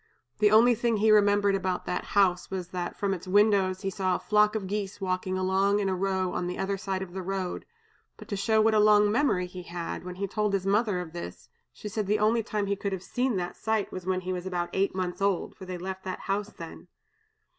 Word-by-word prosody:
The 210 Hz, -1 st, +5 dB
only 230 Hz, +3 st, +6 dB
thing 235 Hz, -1 st, 0 dB
he 215 Hz, +1 st, +4 dB
remembered 205 Hz, -1 st, +4 dB
about 185 Hz, -2 st, -1 dB
that 180 Hz, -, -2 dB
house 180 Hz, -3 st, +3 dB
was 185 Hz, -2 st, -4 dB
that 180 Hz, -1 st, -4 dB
from 200 Hz, -1 st, 0 dB
its 185 Hz, 0 st, -7 dB
windows 195 Hz, -1 st, +3 dB
he 195 Hz, -1 st, -2 dB
saw 185 Hz, -1 st, 0 dB
a -, -, -2 dB
flock 210 Hz, 0 st, +3 dB
of 210 Hz, -3 st, -2 dB
geese 200 Hz, 0 st, -4 dB
walking 185 Hz, -1 st, -2 dB
along 190 Hz, +2 st, +2 dB
in 205 Hz, -1 st, 0 dB
a 190 Hz, -, 0 dB
row 190 Hz, -1 st, -1 dB
on 175 Hz, -, -2 dB
the 180 Hz, -, -4 dB
other 195 Hz, +1 st, -1 dB
side 190 Hz, -1 st, -3 dB
of 175 Hz, -2 st, -10 dB
the 190 Hz, -, -4 dB
road; 190 Hz, -1 st, -4 dB, 0.5 s
but -, -, -12 dB
to 205 Hz, -, -2 dB
show 220 Hz, +3 st, +2 dB
what 220 Hz, 0 st, +3 dB
a 215 Hz, -, +4 dB
long 210 Hz, 0 st, +5 dB
memory 225 Hz, -7 st, +2 dB
he 180 Hz, 0 st, -8 dB
had, 170 Hz, -1 st, -5 dB
when 180 Hz, 0 st, -7 dB
he 200 Hz, +2 st, -2 dB
told 210 Hz, +1 st, -1 dB
his 195 Hz, -1 st, 0 dB
mother 205 Hz, -2 st, +1 dB
of 165 Hz, -2 st, -9 dB
this, 170 Hz, -, -8 dB, 0.2 s
she -, -, -9 dB
said 210 Hz, 0 st, -3 dB
the 210 Hz, +1 st, +2 dB
only 220 Hz, +2 st, +2 dB
time 210 Hz, -2 st, -2 dB
he 200 Hz, 0 st, 0 dB
could 200 Hz, 0 st, -3 dB
have 190 Hz, -1 st, -5 dB
seen 250 Hz, -2 st, -1 dB
that 180 Hz, -1 st, -3 dB
sight 220 Hz, -1 st, -1 dB
was, 185 Hz, -1 st, -7 dB
when 185 Hz, 0 st, 0 dB
he 185 Hz, 0 st, -3 dB
was 180 Hz, 0 st, -4 dB
about 175 Hz, -2 st, -2 dB
eight 195 Hz, 0 st, 0 dB
months 185 Hz, 0 st, -3 dB
old, 195 Hz, -2 st, 0 dB
for 190 Hz, -, -10 dB
they 185 Hz, -1 st, -4 dB
left 190 Hz, +1 st, -6 dB
that 185 Hz, -1 st, -5 dB
house 205 Hz, +1 st, -2 dB
then. 165 Hz, 0 st, -10 dB
195 Hz, 245 wpm, -28 LUFS, 185-210 Hz, 0.5 s, only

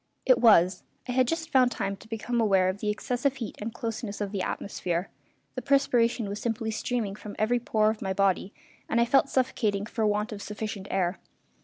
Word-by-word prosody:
It -, -, +5 dB
was. 185 Hz, -5 st, +5 dB, 0.3 s
I -, -, -2 dB
had 255 Hz, 0 st, +3 dB
just 325 Hz, +3 st, -2 dB
found 255 Hz, -2 st, +5 dB
time 195 Hz, -4 st, -2 dB
to 220 Hz, -, -16 dB
become 230 Hz, +2 st, -2 dB
aware 190 Hz, -4 st, +3 dB
of 185 Hz, +2 st, -4 dB
the 210 Hz, -, -1 dB
excessive 245 Hz, +5 st, -1 dB
heat 235 Hz, -5 st, -6 dB
and 220 Hz, +2 st, -3 dB
closeness 225 Hz, -2 st, -5 dB
of 205 Hz, -2 st, -3 dB
the 200 Hz, -2 st, -2 dB
atmosphere. 180 Hz, -2 st, -3 dB, 0.4 s
The -, -, -4 dB
perspiration 245 Hz, -5 st, +2 dB
was 200 Hz, +1 st, -5 dB
simply 225 Hz, -1 st, -2 dB
streaming 220 Hz, -2 st, -2 dB
from 210 Hz, -1 st, -9 dB
every 235 Hz, +3 st, +2 dB
pore 215 Hz, -2 st, +2 dB
of 220 Hz, -, -8 dB
my 190 Hz, -, -2 dB
body, 190 Hz, 0 st, +1 dB, 0.4 s
and 235 Hz, -, +2 dB
I 235 Hz, -, +4 dB
felt 270 Hz, +3 st, +3 dB
suffocating 215 Hz, -6 st, 0 dB
for 220 Hz, -1 st, -1 dB
want 210 Hz, +2 st, 0 dB
of 205 Hz, -1 st, -6 dB
sufficient 210 Hz, -2 st, -5 dB
air. 185 Hz, -1 st, 0 dB
215 Hz, 200 wpm, -27 LUFS, 200-240 Hz, 0.4 s, It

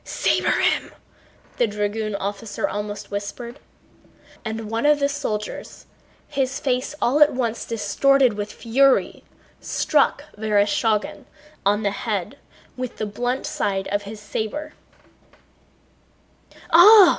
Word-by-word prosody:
"Saber -, -, +1 dB
him!" -, -, +1 dB, 0.7 s
the 240 Hz, -, +3 dB
dragoon 210 Hz, 0 st, -2 dB
officer 200 Hz, +2 st, -3 dB
almost 205 Hz, 0 st, -5 dB
whispered. 235 Hz, +6 st, -5 dB, 0.8 s
And 220 Hz, 0 st, -4 dB
one 230 Hz, +6 st, +1 dB
of 300 Hz, 0 st, +5 dB
the 280 Hz, -1 st, +2 dB
soldiers, 270 Hz, -8 st, -5 dB, 0.4 s
his 265 Hz, -1 st, -1 dB
face 255 Hz, 0 st, -1 dB
all 280 Hz, +4 st, +2 dB
at 300 Hz, -, +7 dB
once 235 Hz, -3 st, -2 dB
distorted 235 Hz, +4 st, +3 dB
with 205 Hz, 0 st, -4 dB
fury, 260 Hz, +5 st, +2 dB, 0.4 s
struck 290 Hz, -1 st, +1 dB
Vereshchágin 210 Hz, 0 st, +1 dB, 0.4 s
on 205 Hz, +2 st, +2 dB
the 200 Hz, -, +1 dB
head 205 Hz, +4 st, -3 dB, 0.4 s
with 255 Hz, -1 st, -5 dB
the 215 Hz, -, -2 dB
blunt 245 Hz, +5 st, -2 dB
side 195 Hz, -1 st, -1 dB
of 205 Hz, +1 st, 0 dB
his 205 Hz, +1 st, -9 dB
saber. 220 Hz, +9 st, -4 dB, 2.0 s
"Ah!" 380 Hz, +2 st, +9 dB
225 Hz, 115 wpm, -23 LUFS, 205-270 Hz, 2.0 s, Ah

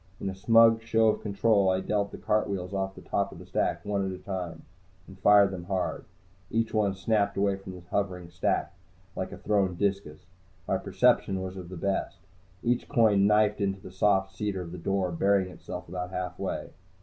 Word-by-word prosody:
In 95 Hz, -, -3 dB
a -, -, -9 dB
smug 115 Hz, +3 st, +5 dB
show 115 Hz, -1 st, +3 dB
of -, -, -1 dB
control, 100 Hz, -1 st, +2 dB
I 95 Hz, 0 st, +2 dB
dealt 100 Hz, +1 st, -1 dB
the -, -, -8 dB
cartwheels 100 Hz, -3 st, -1 dB
off 95 Hz, 0 st, -2 dB
the -, -, -12 dB
top -, -, -1 dB
of -, -, -11 dB
the -, -, -11 dB
stack, -, -, -1 dB
one 100 Hz, -1 st, 0 dB
at 95 Hz, -, -2 dB
a 95 Hz, -, -6 dB
time, 90 Hz, -3 st, -5 dB, 0.4 s
and -, -, -13 dB
fired 100 Hz, -1 st, +6 dB
them 90 Hz, -2 st, -6 dB
hard. 95 Hz, -2 st, -2 dB, 0.4 s
Each 115 Hz, 0 st, 0 dB
one 105 Hz, -3 st, +1 dB
snapped 100 Hz, +1 st, 0 dB
away 100 Hz, 0 st, +2 dB
from 95 Hz, -1 st, -9 dB
the 90 Hz, -, -10 dB
hovering 90 Hz, -4 st, -2 dB
stack, 85 Hz, -, -1 dB, 0.4 s
like 95 Hz, -, -4 dB
a -, -, -8 dB
thrown 100 Hz, -4 st, +1 dB
discus. 95 Hz, -4 st, -2 dB, 0.4 s
My -, -, +1 dB
perception 95 Hz, -1 st, +2 dB
was 95 Hz, 0 st, -5 dB
of 90 Hz, -2 st, -8 dB
the 90 Hz, -, -7 dB
best. 100 Hz, +3 st, -2 dB, 0.5 s
Each 120 Hz, 0 st, 0 dB
coin 105 Hz, -7 st, +4 dB
knifed 105 Hz, 0 st, +3 dB
into 95 Hz, -1 st, 0 dB
the 95 Hz, -, -11 dB
soft 95 Hz, 0 st, +2 dB
cedar 100 Hz, -2 st, -2 dB
of 85 Hz, -, -9 dB
the 90 Hz, -, -7 dB
door, 95 Hz, +1 st, 0 dB
burying 95 Hz, +2 st, +2 dB
itself -, -, -8 dB
about 90 Hz, +1 st, -4 dB
halfway. 90 Hz, -1 st, -4 dB
95 Hz, 195 wpm, -28 LUFS, 95-105 Hz, 0.5 s, fired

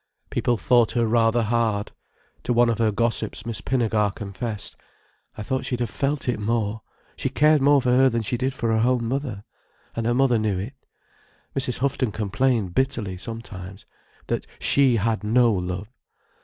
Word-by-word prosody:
People 120 Hz, -, +1 dB
thought 120 Hz, 0 st, +3 dB
her 120 Hz, -1 st, +2 dB
rather 115 Hz, +1 st, +3 dB
hard. 110 Hz, -2 st, 0 dB, 0.5 s
To 125 Hz, -, -1 dB
one 120 Hz, 0 st, +4 dB
of 115 Hz, -, -3 dB
her 110 Hz, -2 st, +3 dB
gossips 115 Hz, +3 st, -1 dB
Miss 115 Hz, -3 st, -4 dB
Pinnegar 110 Hz, -5 st, +1 dB
confessed: 105 Hz, +1 st, -5 dB, 0.6 s
"I 105 Hz, -, -4 dB
thought 130 Hz, +5 st, -2 dB
she'd 125 Hz, -, -2 dB
have 120 Hz, -3 st, -2 dB
felt 140 Hz, +2 st, -1 dB
it 120 Hz, -3 st, 0 dB
more. 110 Hz, 0 st, -1 dB, 0.3 s
She 135 Hz, -, -2 dB
cared 150 Hz, +2 st, +4 dB
more 140 Hz, +1 st, +5 dB
for 125 Hz, -, +2 dB
her 130 Hz, +1 st, +5 dB
than 115 Hz, -2 st, -1 dB
she 110 Hz, -, -1 dB
did 130 Hz, +2 st, -1 dB
for 120 Hz, -4 st, -2 dB
her -, -, +2 dB
own 125 Hz, -2 st, +1 dB
mother—and 115 Hz, -2 st, -6 dB
her 120 Hz, -, +2 dB
mother 125 Hz, -3 st, +3 dB
knew 105 Hz, -3 st, 0 dB
it. 105 Hz, +9 st, -5 dB, 0.8 s
Mrs. 130 Hz, -3 st, -1 dB
Houghton 130 Hz, -3 st, 0 dB
complained 110 Hz, -1 st, 0 dB
bitterly, 120 Hz, -6 st, -1 dB
sometimes, 100 Hz, -2 st, -8 dB, 0.4 s
that -, -, -3 dB
she 135 Hz, -3 st, +4 dB
had 110 Hz, 0 st, 0 dB
no 115 Hz, +2 st, +4 dB
love. 90 Hz, +1 st, -3 dB
115 Hz, 170 wpm, -24 LUFS, 105-130 Hz, 0.8 s, more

